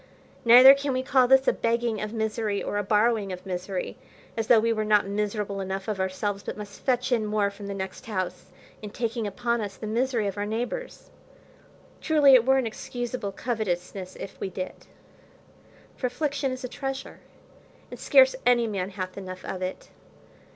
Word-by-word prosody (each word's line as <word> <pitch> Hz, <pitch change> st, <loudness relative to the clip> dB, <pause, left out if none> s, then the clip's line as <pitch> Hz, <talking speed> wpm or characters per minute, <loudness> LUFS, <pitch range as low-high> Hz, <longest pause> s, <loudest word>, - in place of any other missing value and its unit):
Neither 250 Hz, +3 st, +10 dB
can 280 Hz, 0 st, -2 dB
we 255 Hz, 0 st, -1 dB
call 260 Hz, -1 st, +4 dB
this 265 Hz, +1 st, +5 dB
a -, -, +5 dB
begging 230 Hz, -2 st, -1 dB
of 210 Hz, 0 st, -4 dB
misery, 220 Hz, -2 st, -2 dB
or 205 Hz, -, -2 dB
a -, -, -1 dB
borrowing 210 Hz, 0 st, +2 dB
of 180 Hz, +1 st, -7 dB
misery, 185 Hz, 0 st, -4 dB, 0.4 s
as 225 Hz, -1 st, -2 dB
though 230 Hz, -, +7 dB
we 230 Hz, +1 st, +1 dB
were 215 Hz, -1 st, -1 dB
not 210 Hz, -1 st, +3 dB
miserable 205 Hz, 0 st, -2 dB
enough 190 Hz, 0 st, -4 dB
of 210 Hz, -3 st, -2 dB
ourselves, 190 Hz, +2 st, -2 dB
but -, -, -6 dB
must 205 Hz, -1 st, -9 dB
fetch 255 Hz, -1 st, 0 dB
in 235 Hz, -3 st, +2 dB
more 210 Hz, -1 st, 0 dB
from 200 Hz, 0 st, -9 dB
the 200 Hz, -, -4 dB
next 190 Hz, +2 st, -6 dB
house, 185 Hz, -4 st, -3 dB, 0.4 s
in 210 Hz, -, -6 dB
taking 230 Hz, 0 st, -3 dB
upon 235 Hz, +3 st, -1 dB
us 200 Hz, -2 st, -6 dB
the -, -, -7 dB
misery 235 Hz, +1 st, 0 dB
of 200 Hz, 0 st, -3 dB
our 205 Hz, -, -1 dB
neighbours. 245 Hz, -, -5 dB, 0.9 s
Truly 295 Hz, -3 st, +5 dB
it 250 Hz, -1 st, +6 dB
were 265 Hz, 0 st, +5 dB
an 260 Hz, -, +1 dB
excusable 240 Hz, -1 st, -4 dB
covetousness 190 Hz, -4 st, -3 dB
if 195 Hz, -, -9 dB
we 195 Hz, -, -3 dB
did, 185 Hz, 0 st, -7 dB, 1.1 s
for 255 Hz, -, -1 dB
affliction 280 Hz, +1 st, -2 dB
is 255 Hz, +1 st, -6 dB
a -, -, -2 dB
treasure, 270 Hz, +1 st, -6 dB, 0.7 s
and -, -, -8 dB
scarce -, -, +5 dB
any 240 Hz, -1 st, +4 dB
man 195 Hz, -4 st, -3 dB
hath 185 Hz, -1 st, -6 dB
enough 185 Hz, -1 st, -8 dB
of 185 Hz, -, -5 dB
it. 185 Hz, 0 st, -5 dB
215 Hz, 185 wpm, -26 LUFS, 195-245 Hz, 1.1 s, Neither